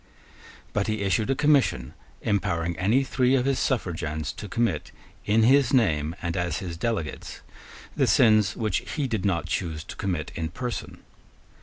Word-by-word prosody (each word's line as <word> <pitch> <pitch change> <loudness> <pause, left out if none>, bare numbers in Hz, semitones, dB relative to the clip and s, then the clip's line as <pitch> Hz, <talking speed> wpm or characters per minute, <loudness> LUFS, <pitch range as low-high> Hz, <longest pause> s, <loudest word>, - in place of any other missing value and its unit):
But 105 - 0
he 110 -1 -1
issued 105 +4 +1
a 135 - +2
commission 130 - +2 0.3
empowering 85 -5 0
any 110 +9 +3
three 130 0 +2
of 125 -1 +1
his 135 -1 +1
suffragans 80 - -2
to 105 - -8
commit, 115 +3 -1 0.4
in 110 +2 +4
his 135 +2 +4
name, 80 -9 +2
and 85 -1 -2
as 85 -1 -1
his 90 -4 -5
delegates, 100 -4 -4 0.5
the - - +2
sins 110 -4 +4
which 110 -3 0 0.2
he 150 -3 0
did 110 -6 -2
not 90 -4 +1
choose 80 -4 -3
to - - -9
commit 90 -6 -3
in 80 -1 -3
person. 120 +7 -6
100 Hz, 160 wpm, -26 LUFS, 85-120 Hz, 0.5 s, in